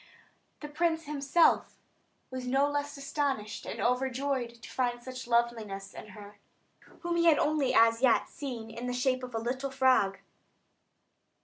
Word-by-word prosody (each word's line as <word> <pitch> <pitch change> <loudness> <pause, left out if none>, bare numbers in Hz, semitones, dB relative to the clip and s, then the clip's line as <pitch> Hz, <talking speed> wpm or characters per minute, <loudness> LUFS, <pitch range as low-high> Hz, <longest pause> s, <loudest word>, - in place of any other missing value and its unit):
The 295 - -5
prince 325 +2 0
himself 290 +3 +2 0.5
was 255 -1 -5
no 270 +3 +3
less 290 0 -3
astonished 275 -6 -2
and - - -5
overjoyed 255 -1 -1
to - - -8
find 245 -2 -1
such 255 -1 -7
loveliness 225 -5 -1
in - - -9
her, 205 0 -12 0.6
whom 345 -1 -1
he 335 - +3
had 325 -3 +6
only 295 -3 +1
as 230 +1 +5
yet 255 -3 +4
seen 245 -7 -7
in 240 +2 -6
the 250 - -2
shape 255 +1 +1
of 250 -2 -7
a - - 0
little 255 +4 -3
frog. 260 -7 +3
255 Hz, 150 wpm, -30 LUFS, 235-285 Hz, 0.6 s, had